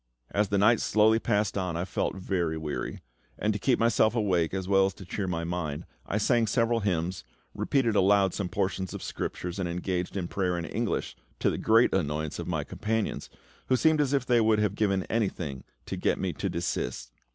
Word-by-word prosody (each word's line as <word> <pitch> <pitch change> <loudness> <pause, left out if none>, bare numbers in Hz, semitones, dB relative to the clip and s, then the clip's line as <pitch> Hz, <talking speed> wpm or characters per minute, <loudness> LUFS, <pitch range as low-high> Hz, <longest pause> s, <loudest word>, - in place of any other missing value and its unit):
As 105 0 +1
the 100 +1 0
night 110 +4 +5
slowly 110 +1 +4
passed 105 -3 0
on, 90 -3 -2
I 85 - -1
felt - - -2
very 90 -4 -1
weary; 75 -2 -4 0.3
and 105 +1 0
to 105 - -3
keep 130 -3 +2
myself 115 0 +3
awake, 90 -7 +1
as 95 -1 -3
well 95 0 +4
as 95 - -6
to 95 - -11
cheer 95 +2 -3
my 85 -2 -2
mind, 85 -4 -3 0.2
I 105 - -1
sang 115 +2 +2
several 115 +2 +2
hymns, 90 -2 -1 0.3
repeated 120 -6 +1
aloud 100 -1 +4
some 100 -3 -3
portions 95 -2 -2
of - - -6
Scripture, 90 - -4
and 90 -2 -1
engaged 90 +2 -2
in 90 -3 -2
prayer 90 -1 -1
in 85 - -3
English, 115 +4 -2 0.2
to - - +1
the - - -3
great 115 +2 +4
annoyance 75 -4 -1
of - - -5
my - - -1
companions, 110 0 -2 0.4
who 130 - +3
seemed 155 +3 +3
as 140 -2 +1
if 140 -3 +1
they 120 -2 +4
would 110 -1 +4
have 105 -2 +1
given 100 -3 +1
anything 85 - -2 0.2
to - - -4
get - - 0
me - - -2
to - - -3
desist. 65 -7 -3
95 Hz, 205 wpm, -28 LUFS, 90-110 Hz, 0.4 s, night